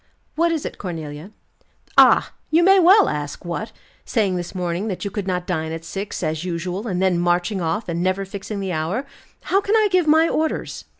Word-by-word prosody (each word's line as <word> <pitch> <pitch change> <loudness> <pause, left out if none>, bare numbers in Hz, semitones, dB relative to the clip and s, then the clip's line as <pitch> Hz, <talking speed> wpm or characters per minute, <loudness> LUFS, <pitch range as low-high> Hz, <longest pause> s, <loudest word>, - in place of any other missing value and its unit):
"What 335 +1 +2
is 320 -3 -2
it, - - -6
Cornelia?" 160 -2 -6 0.7
"Ah! - - +6 0.2
You 330 +2 +4
may 385 +2 +6
well 380 +4 +6
ask 145 +3 -4
what? 175 +6 -4 0.3
Saying 205 -6 0
this 175 +2 -5
morning 180 +3 -2
that 195 -1 -4
you 200 - -3
could 205 -1 -4
not 180 -1 -1
dine 160 -3 -2
at 165 0 -6
six, 195 +4 -5
as 155 +1 -2
usual, 180 +4 -4
and 180 -4 -2
then 185 -2 +2
marching 175 +3 0
off, 185 +6 -2
and 170 0 -2
never 185 +2 0
fixing 200 +1 -6
the 190 -1 -3
hour. 170 - -2 0.4
How 390 - +1
can 405 +2 +1
I 430 -2 +4
give 365 -3 +3
my 320 +2 +5
orders?" 315 -1 -2
190 Hz, 200 wpm, -21 LUFS, 175-250 Hz, 0.7 s, Ah